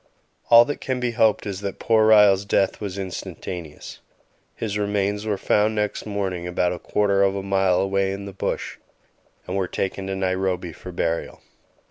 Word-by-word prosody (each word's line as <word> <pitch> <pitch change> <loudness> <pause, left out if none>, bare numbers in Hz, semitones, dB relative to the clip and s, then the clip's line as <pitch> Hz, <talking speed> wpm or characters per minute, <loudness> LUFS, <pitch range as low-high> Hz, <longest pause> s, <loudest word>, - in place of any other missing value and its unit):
All 115 0 +9
that 145 - -5
can 130 -1 -2
be 125 -1 -1
hoped 110 -2 +2
is 100 -1 -4
that 100 -1 -4
poor 110 -1 +3
Ryall's 105 -3 +6
death 100 -1 0
was 100 -2 -5
instantaneous. 90 -4 -7 0.6
His 105 -3 -4
remains 105 0 -1
were 105 -2 0
found 105 +3 +2
next 105 0 -2
morning 95 -4 -3
about 90 0 0
a 90 - -7
quarter 100 -1 +1
of 100 0 +3
a 100 - -3
mile 95 -2 +2
away 95 0 +1
in 100 +1 -5
the 100 - -8
bush, 95 - -3 0.7
and 90 - -4
were 95 -2 0
taken 95 +1 -3
to 95 - -2
Nairobi 95 -2 -1
for 90 - -10
burial. 85 -1 -3
100 Hz, 175 wpm, -23 LUFS, 95-105 Hz, 0.7 s, All